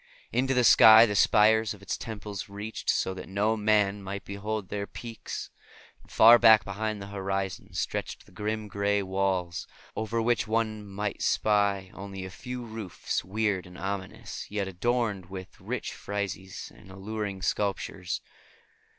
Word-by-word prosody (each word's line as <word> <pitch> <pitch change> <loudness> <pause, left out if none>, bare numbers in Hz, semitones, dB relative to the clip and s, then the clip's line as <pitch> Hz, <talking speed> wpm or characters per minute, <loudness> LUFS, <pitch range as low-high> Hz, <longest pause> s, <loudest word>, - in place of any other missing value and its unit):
Into 130 +2 +1
the 125 - +4
sky 110 -1 +9
the 105 - -2
spires 110 +1 +4
of 100 - -17
its 100 - -2
temples 105 -4 -6
reached, 105 +2 -6
so 95 - +1
that 95 0 -9
no 105 +3 +1
man 105 -2 +2
might 100 -1 -6
behold 100 0 -4
their 100 -1 -3
peaks; 115 -2 -7 0.5
and - - -22
far 115 +2 +8
back 110 -1 +7
beyond 110 +2 -3
the 100 0 -8
horizon 95 -2 -3
stretched - - -3
the - - -20
grim, 105 +3 -3
gray 100 0 0
walls, 95 -4 -1 0.3
over 110 +1 -2
which 120 +1 +1
one 110 -1 0
might 100 +1 -4
spy 100 -3 +1
only 95 -1 -7
a 95 - -8
few 125 +3 -6
roofs, 110 -5 -4
weird 100 -1 -1
and 90 0 -12
ominous, 95 0 -5
yet 100 -2 -2
adorned 105 0 -1
with 95 0 -9
rich - - -4
friezes 100 -2 -5
and - - -16
alluring 100 0 -5
sculptures. 95 -2 -2
100 Hz, 150 wpm, -28 LUFS, 95-110 Hz, 0.5 s, sky